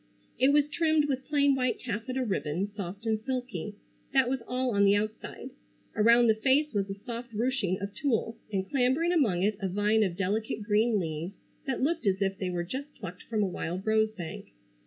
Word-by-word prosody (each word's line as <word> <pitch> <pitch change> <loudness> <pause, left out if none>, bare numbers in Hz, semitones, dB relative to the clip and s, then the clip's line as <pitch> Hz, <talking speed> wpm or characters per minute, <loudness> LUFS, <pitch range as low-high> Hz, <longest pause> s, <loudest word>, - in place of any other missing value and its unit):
It 265 +2 +5
was 295 0 +4
trimmed 315 -1 +2
with 270 -2 -2
plain 285 -2 +3
white 255 -2 0
taffeta 255 +3 -3
ribbon, 185 -3 -1
soft 200 +2 -6
and 220 -1 +1
silky. 245 -7 -4 0.4
That 265 -2 +4
was 265 -2 -1
all 255 0 0
on 200 -2 +3
the 200 0 +5
outside. 215 +5 -4 0.4
Around 235 +2 +6
the 225 - +5
face 270 +6 +2
was 200 -1 0
a 195 - -3
soft 235 +3 -7
ruching 225 -5 0
of 200 +1 -5
tulle, 230 -4 0 0.2
and 190 -2 -1
clambering 275 - +2
among 220 - +2
it 210 0 +1
a 195 - -1
vine 205 +4 +2
of 185 -4 0
delicate 210 +2 -1
green 215 +1 +2
leaves 165 +2 -4 0.3
that 260 -1 -1
looked 320 -4 0
as 190 0 +2
if 195 -1 0
they 185 - -1
were 175 -1 -2
just 270 +11 -6
plucked 180 -2 -8
from 215 -3 +1
a - - +1
wild 180 +1 -4
rose 220 0 +3
bank. 175 -7 -7
220 Hz, 200 wpm, -29 LUFS, 195-260 Hz, 0.4 s, Around